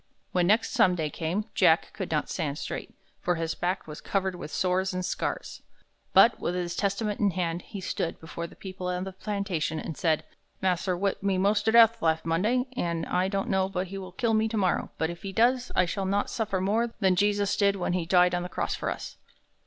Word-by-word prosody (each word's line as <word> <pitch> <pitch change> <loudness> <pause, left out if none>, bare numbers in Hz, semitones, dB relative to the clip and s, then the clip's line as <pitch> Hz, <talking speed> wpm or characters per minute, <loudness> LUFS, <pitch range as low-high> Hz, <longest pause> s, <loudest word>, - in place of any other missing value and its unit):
When 180 -1 +2
next 215 +4 +3
Sunday 170 -5 +2
came, 175 +8 -2
Jack - - +3
could - - -5
not - - 0
stand 150 -5 -3
straight, - - -5 0.3
for 175 - 0
his 165 0 -2
back 180 +2 -2
was 150 -1 -9
covered 190 -1 -1
with 175 - -7
sores 185 +2 0
and 185 0 -2
scars. - - -3 0.5
But, - - +6
with 175 - -2
his 175 -1 -2
Testament 205 +1 -1
in 205 - +3
his 180 - -6
hand, 170 -1 -1
he 200 - -8
stood 170 -2 -3
before 170 +1 -6
the - - -16
people 185 -1 -6
of 180 +1 -2
the 190 - -5
plantation, 190 -6 -2
and 160 - -5
said, 160 -1 +1 0.4
"Mas'r 185 0 0
whip 195 +1 -1
me 195 -1 +1
mos' 205 +2 +3
ter 220 +1 +2
death 230 0 +7
last 160 -1 +1
Monday, 210 +10 +1
an' 170 -6 -1
I 180 +1 +1
don't 195 0 -1
know 190 0 +2
but 185 -1 -3
he 195 +1 -5
will 185 -1 -8
kill 225 +4 0
me 220 0 +3
tomorrow, 205 -5 0
but 160 +1 0
if 170 - -10
he 195 - -5
does, 245 +4 +2
I 185 - +4
shall 195 +3 -3
not 200 +1 0
suffer 215 -4 -1
more 225 +5 0
than 190 -2 +3
Jesus 205 +1 +2
did 200 -2 +3
when 175 -2 -1
he 175 -2 -1
died 180 0 +5
on 175 - 0
the 180 - -5
cross - - -2
for - - -2
us." - - -6
185 Hz, 225 wpm, -27 LUFS, 175-200 Hz, 0.5 s, death